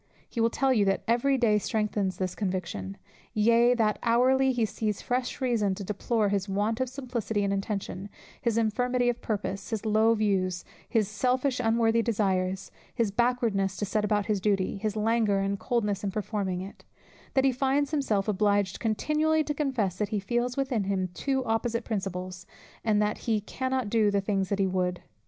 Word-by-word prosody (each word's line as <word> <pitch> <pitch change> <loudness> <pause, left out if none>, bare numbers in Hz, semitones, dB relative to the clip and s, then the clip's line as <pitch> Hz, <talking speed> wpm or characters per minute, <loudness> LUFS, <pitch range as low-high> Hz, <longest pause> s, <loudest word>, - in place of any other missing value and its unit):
He 235 - -3
will 230 - +4
tell 265 +3 +2
you, 215 -5 +3
that 195 0 +1
every 245 +4 +2
day 220 -4 +3
strengthens 210 -4 -1
this 185 -1 -2
conviction; 180 - -3 0.4
yea, 235 +3 +4
that 215 -3 +1
hourly 260 +3 +3
he 240 -3 +1
sees 210 -1 -2
fresh 250 +2 -2
reason 230 -7 +1
to 200 - -6
deplore 210 +2 0
his 200 0 -1
want 210 +4 0
of 260 - 0
simplicity 240 -5 -2
in 200 - 0
intention, 195 -1 -3 0.3
his 230 -2 0
infirmity 245 +2 +1
of 240 - -2
purpose, 200 -2 -3
his 220 -1 -3
low 220 +1 +4
views, 190 -4 0 0.2
his 220 -4 +2
selfish 255 +5 0
unworthy 230 -1 +3
desires, 195 -4 0 0.2
his 230 -5 +1
backwardness 220 -4 +1
to 205 - -1
set 210 +1 0
about 210 -1 +1
his 210 -3 0
duty, 195 -1 +1
his 210 +1 -2
languor 220 -1 +2
and 195 0 -1
coldness 210 -5 -1
in 200 - 0
performing 195 -2 -2
it: 195 +2 -10 0.5
that 265 0 +4
he 270 - +5
finds 270 +2 +1
himself 225 -10 0
obliged 205 -2 +1
continually 305 +8 +1
to 295 - -2
confess, 255 - -1
that 210 - 0
he 210 - -1
feels 240 +5 -1
within 260 -7 0
him 190 -2 -1
two 265 +6 -1
opposite 230 +1 -1
principles, 185 -4 -4 0.4
and 215 -2 +2
that 210 0 -1
"he 220 -2 +3
cannot 260 +3 -2
do 215 0 +3
the 200 0 +2
things 195 -1 -1
that 200 - 0
he 195 - +2
would." 180 -1 -1
215 Hz, 180 wpm, -28 LUFS, 195-240 Hz, 0.5 s, he